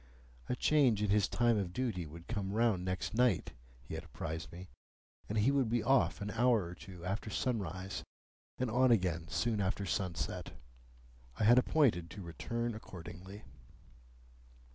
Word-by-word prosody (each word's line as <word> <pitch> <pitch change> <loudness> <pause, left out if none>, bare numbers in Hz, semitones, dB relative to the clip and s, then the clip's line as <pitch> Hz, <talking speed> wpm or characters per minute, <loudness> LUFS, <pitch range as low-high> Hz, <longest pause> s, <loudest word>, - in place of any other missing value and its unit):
A - - +1
change 125 -8 +3
in 105 - +1
his 105 -1 +4
time 120 -2 +2
of 90 -3 -3
duty 110 -10 -2
would 85 +3 -11
come 100 -4 -2
round 110 -5 +2
next 95 +2 -2
night, 120 -5 +2 0.3
he - - -9
had - - -4
apprised 80 +1 -5
me, 90 +2 -9 0.6
and 110 - -1
he 110 +6 +4
would 135 -5 +2
be 120 0 +1
off 135 -4 +3
an 100 0 -3
hour 120 -2 +3
or 85 +1 -6
two 90 -2 -10
after 100 +4 -2
sunrise, 95 -6 -2 0.5
and 125 -3 -1
on 130 +2 +4
again 90 -7 +2
soon 110 +3 0
after 100 +1 -1
sunset. 90 -2 -2 0.8
I - - 0
had 120 +4 +7
appointed 125 - +2
to 100 +1 -8
return 115 +8 -3
accordingly. 95 -1 -9
105 Hz, 160 wpm, -34 LUFS, 90-120 Hz, 0.8 s, had